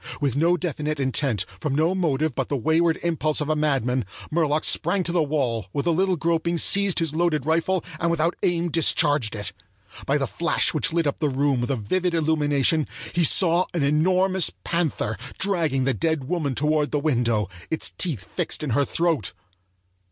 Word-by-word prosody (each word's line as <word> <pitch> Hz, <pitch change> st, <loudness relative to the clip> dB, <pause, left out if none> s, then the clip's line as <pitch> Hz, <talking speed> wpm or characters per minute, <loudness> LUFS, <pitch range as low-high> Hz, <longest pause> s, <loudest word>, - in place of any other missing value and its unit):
With 140 Hz, -4 st, 0 dB
no 170 Hz, +4 st, +3 dB
definite 155 Hz, -2 st, -3 dB
intent, 130 Hz, -6 st, 0 dB
from 145 Hz, -3 st, -2 dB
no 160 Hz, +4 st, +2 dB
motive 155 Hz, -5 st, 0 dB
but 135 Hz, 0 st, -3 dB
the 140 Hz, -, 0 dB
wayward 160 Hz, +5 st, +2 dB
impulse 155 Hz, -3 st, 0 dB
of 150 Hz, 0 st, -2 dB
a 155 Hz, -, +2 dB
madman, 135 Hz, -5 st, 0 dB, 0.3 s
Murlock 155 Hz, -1 st, +1 dB
sprang 200 Hz, -2 st, +1 dB
to 170 Hz, -, -1 dB
the 175 Hz, -1 st, +2 dB
wall, 130 Hz, -, -1 dB
with 140 Hz, -, -2 dB
a 170 Hz, -, +3 dB
little 185 Hz, +3 st, +2 dB
groping 170 Hz, +1 st, 0 dB
seized 200 Hz, +2 st, +3 dB
his 165 Hz, -3 st, +1 dB
loaded 155 Hz, -4 st, 0 dB
rifle, 165 Hz, +3 st, 0 dB
and 170 Hz, -, +1 dB
without 170 Hz, 0 st, +1 dB
aim 175 Hz, -1 st, 0 dB
discharged 145 Hz, -7 st, +2 dB
it. 105 Hz, -2 st, -5 dB, 0.5 s
By 140 Hz, -, +2 dB
the 140 Hz, -, 0 dB
flash 170 Hz, +6 st, +1 dB
which 160 Hz, +1 st, 0 dB
lit 165 Hz, 0 st, +1 dB
up 145 Hz, -, -1 dB
the 150 Hz, -, +1 dB
room 135 Hz, -1 st, +1 dB
with 120 Hz, -, -2 dB
a 135 Hz, -, +1 dB
vivid 170 Hz, -, -1 dB
illumination, 150 Hz, -1 st, +1 dB, 0.3 s
he 175 Hz, -, +2 dB
saw 175 Hz, +2 st, +3 dB
an 165 Hz, -, +1 dB
enormous 185 Hz, +5 st, +2 dB
panther 160 Hz, -10 st, -1 dB, 0.2 s
dragging 165 Hz, -9 st, +1 dB
the 135 Hz, 0 st, +1 dB
dead 160 Hz, +4 st, -1 dB
woman 145 Hz, -2 st, -2 dB
toward 150 Hz, +1 st, +1 dB
the 150 Hz, -, -1 dB
window, 120 Hz, -7 st, +1 dB, 0.2 s
its 160 Hz, -, -2 dB
teeth 145 Hz, -, -2 dB
fixed -, -, -2 dB
in 145 Hz, -, -2 dB
her 140 Hz, +5 st, +2 dB
throat! 165 Hz, -, 0 dB
155 Hz, 185 wpm, -24 LUFS, 140-170 Hz, 0.5 s, no